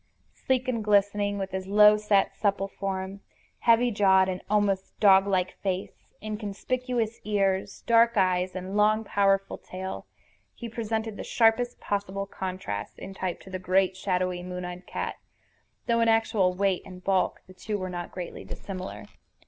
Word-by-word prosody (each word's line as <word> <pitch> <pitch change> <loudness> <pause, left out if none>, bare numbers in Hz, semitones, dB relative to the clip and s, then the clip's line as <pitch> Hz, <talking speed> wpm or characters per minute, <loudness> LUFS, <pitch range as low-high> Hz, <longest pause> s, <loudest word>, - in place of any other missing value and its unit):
Sleek 260 -1 -1
and 230 -4 -1
glistening, 205 0 +2
with 195 -1 -4
his 190 0 -4
low 210 +1 +7
set 210 -2 +2
supple 200 -2 0
form, 195 0 -4 0.4
heavy 235 +1 +4
jawed 190 -2 +4
and 185 0 -3
almost 200 -2 0
dog 195 -2 +6
like 185 -2 +1
face, 190 -1 -4 0.2
inconspicuous 225 +3 -2
ears, 195 -2 0
dark 235 0 +4
eyes, 185 -1 +2
and 185 +2 -5
long, 215 +1 +3
powerful 195 -1 +1
tail, 190 +1 -7 0.5
he 235 - -7
presented 220 -1 -3
the - - -5
sharpest 240 +1 +2
possible 200 -1 -2
contrast 185 - -5
in 195 - -8
type 185 -2 -3
to 190 - -13
the 185 - -4
great, 185 +1 +2
shadowy, 185 -2 -1
moon 180 0 -5
eyed 180 +1 -8
cat, - - -4 0.7
though 230 -1 +2
in 230 - +3
actual 225 -4 +3
weight 190 0 0
and 180 -1 -12
bulk 195 -1 +1
the 185 - -15
two 210 +3 -4
were 185 -1 -4
not 175 -1 -5
greatly 180 -2 -7
dissimilar. 185 -1 -7
195 Hz, 155 wpm, -27 LUFS, 185-215 Hz, 0.7 s, low